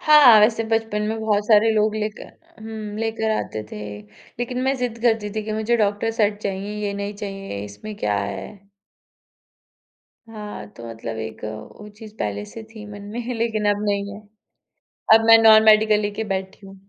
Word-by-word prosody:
हाँ, 290 -8 +8
वैसे 220 +1 +3
बचपन 225 -1 -1
में 220 0 -3
बहुत 210 -1 0
सारे 220 0 +5
लोग 215 0 +2
लेकर 215 0 -4 0.3
हूँ, 220 -2 -6
लेकर 225 0 -1
आते 110 - -4
थे। 105 - -6 0.6
लेकिन 250 +1 -2
मैं 265 +1 +1
ज़िद 245 -2 -3
करती 225 -3 +1
थी 215 - -1
कि 215 - -4
मुझे 220 +2 +1
डॉक्टर 210 +1 0
सेट 205 0 +2
चाहिए, 200 +1 -3
ये 200 - -2
नहीं 200 +1 -4
चाहिए, 195 - -6
इसमें 105 - -9
क्या 105 - 0
है? 195 - -6 1.6
हाँ, 210 - -8
तो 115 - -10
मतलब 115 0 -6
एक 110 0 -7
वो 110 - -8
चीज़ 215 -1 -12
पहले 105 0 -3
से 225 - -10
थी 215 -2 -10
मन 205 - -9
में, 240 - -3 0.2
लेकिन 220 -2 0
अब 205 - -6
नहीं 200 0 -2
है। 205 - -10 0.9
अब 225 0 +5
मैं 225 0 +9
नॉन-मेडिकल 220 -1 +6
लेके 205 +2 -3
बैठी 190 +1 -6
हूँ। 195 - -12
210 Hz, 175 wpm, -22 LUFS, 200-225 Hz, 1.6 s, मैं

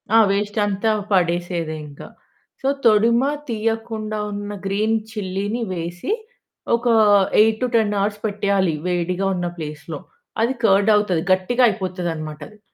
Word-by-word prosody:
ఆ! - - +8
వేస్ట్ 205 +2 -1
అంతా 205 +2 0 0.2
పడేసేదే 175 -3 0
ఇంకా. 145 - -11 0.5
సో 270 - -1 0.2
తొడిమ 230 +2 +5 0.3
తీయకుండా 225 -1 -2
ఉన్న 205 0 -5
గ్రీన్ 215 +3 +1
చిల్లిని 205 +2 -3
వేసి 175 - -4 0.6
ఒక 240 +1 -3 0.5
8-10 220 -1 +2
అవర్స్ 205 +1 -1
పెట్టేయాలి 200 -4 +1
వేడిగా 180 +2 -1
ఉన్న 175 0 -2
ప్లేస్‌లో 150 -1 -6 0.4
అది 250 +3 +1
కర్డ్ 200 +1 +4
అవుతది. 185 -6 0
గట్టిగా 215 +7 +1
అయిపోతదనమాట 175 -6 -4
అది. 215 0 -19
200 Hz, 120 wpm, -21 LUFS, 175-220 Hz, 0.6 s, ఆ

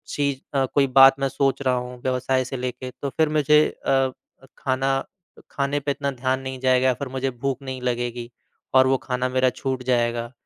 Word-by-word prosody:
चीज़ 140 -2 0 0.2
अ, 135 - +3
कोई 140 +1 +1
बात 135 0 +8
मैं 135 0 0
सोच 135 0 0
रहा 130 -2 +1
हूँ, 125 0 -5
व्यवसाय 130 0 0
से 130 0 -5
लेके, 125 0 -5
तो 140 - -2
फिर 160 -1 +3
मुझे 150 +1 +5 0.2
अ - - -1
अ, 135 -1 +2 0.5
खाना 135 0 0 0.5
खाने 140 +1 -1
पे 140 0 -2
इतना 140 0 -2
ध्यान 130 +1 -1
नहीं 130 -1 -6
जाएगा 130 0 +3
या 130 - +3
फिर 140 +2 -6
मुझे 135 0 -2
भूख 135 +2 -3
नहीं 130 -1 -6
लगेगी 120 -1 -3 0.4
और 130 0 +6
वो 135 0 +3
खाना 125 0 -1
मेरा 130 0 +2
छूट 130 0 -4
जाएगा, 120 -1 0
130 Hz, 200 wpm, -23 LUFS, 125-135 Hz, 0.5 s, बात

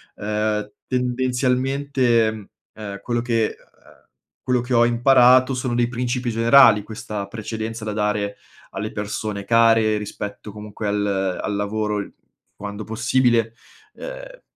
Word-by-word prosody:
uhm, 105 0 -2 0.2
tendenzialmente, 125 -2 0 0.2
uhm, 100 -2 -7
quello 120 -1 -1
che 115 -2 0
uhm, - - -25 0.8
quello 125 -2 +1
che 125 +1 -4
ho 120 0 +5
imparato 125 +2 +5
sono 125 -1 -2
dei 120 0 +2
principi 120 0 -2
generali, 115 -1 +6
questa 105 -1 -6
precedenza 110 +1 -5
da 105 - -3
dare 105 -1 -1 0.3
alle 105 +2 -4
persone 105 -1 -4
care 115 -1 +4
rispetto, 105 0 -7
comunque, 105 0 -7
al 100 -2 -1
al 105 - -2
lavoro 105 +1 -1
l 100 - -7 0.5
quando 105 +1 -6
possibile, 115 0 +1 0.4
uhm, - - -9
110 Hz, 125 wpm, -22 LUFS, 105-125 Hz, 0.8 s, generali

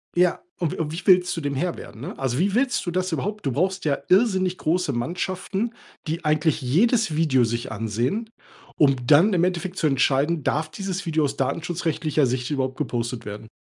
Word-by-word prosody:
Ja, 180 0 +3 0.2
und 170 -4 -1
w - - -6 0.2
wie 180 +4 -6
willst 180 -1 +5
du - - -2
dem 140 -1 -2
Herr 175 +5 -1
werden, 110 - -10
ne? 140 - -7
Also, 130 -2 -1
wie 195 +4 +1
willst 250 -3 +1
du 175 - -2
das 185 0 -1
überhaupt 205 +2 -3
du 135 - 0
brauchst 185 +4 0
ja 140 -2 +2
irrsinnig 185 -2 +3
große 165 -1 0
Mannschaften, 185 - -2 0.4
die 165 +1 -3
eigentlich 155 0 +2
jedes 185 - +2
Video 135 -7 +3
sich 115 +1 -3
ansehen, 120 - -2 0.5
um 140 -3 +4
dann 170 +8 +6
im 175 -1 +2
Endeffekt 180 0 -2
zu 155 - +2
entscheiden, 140 +3 +2
darf 155 +1 0
dieses 195 +3 -4
Video 160 -2 +1
aus 140 - -1
datenschutzrechtlicher 155 +1 0
Sicht 125 0 -2
überhaupt 130 -2 -1
gepostet 120 -1 -3
werden? 105 +1 -7
160 Hz, 190 wpm, -24 LUFS, 135-185 Hz, 0.5 s, dann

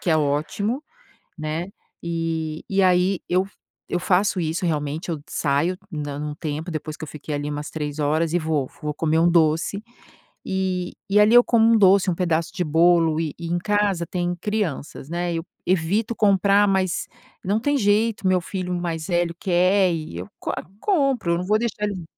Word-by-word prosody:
que 175 - -1
é 160 - +4
ótimo, 155 - -1 0.6
né, 155 +3 -3 0.4
e 165 -2 -3
e 195 0 +2
aí 185 0 +3
eu 185 +2 +2 0.4
eu 175 - -1
faço 185 +1 +2
isso 165 +2 -2
realmente, 155 +2 -2
eu 160 - -2
saio 150 +5 0 0.2
da 145 -2 -4
um 150 0 -4
tempo 155 +2 -4
depois 155 -1 -5
que - - -7
eu - - -11
fiquei 150 0 -6
ali 145 0 -3
umas 150 0 -5
3 150 -1 -4
horas 155 +2 +1
e - - +4
vou 155 -5 -1
vou 150 0 -2
comer 160 +1 +1
um 170 +1 +4
doce 165 +4 +2 0.6
e 185 -2 -2 0.2
e 210 - +5
ali 210 +3 +5
eu 245 0 +8
como 225 -2 +4
um - - +6
doce, 195 -2 +5
um - - 0
pedaço 170 -1 0
de 180 - -1
bolo, 165 0 +3
e 155 -3 -3
e 170 - -6
em 175 - 0
casa 200 -3 0
tem 175 -1 -2
crianças, 185 -10 -3
né, 175 0 -2
eu 165 0 -3 0.2
evito 190 +6 +1
comprar, 200 0 +4
mas 190 -2 0 0.4
não 200 +3 +1
tem 285 +3 +1
jeito, 210 -1 +1
meu 185 0 +4
filho 180 0 -4
mais 165 -3 -3
velho 175 -1 0
quer 185 +1 +3
e 155 - -5
eu 90 - -6
co - - -3 0.3
compro, 275 - +1
eu 170 - +1
não 180 - -4
vou 210 +2 +3
deixar 215 -2 -2
ele 195 -5 -3
175 Hz, 190 wpm, -23 LUFS, 155-195 Hz, 0.6 s, eu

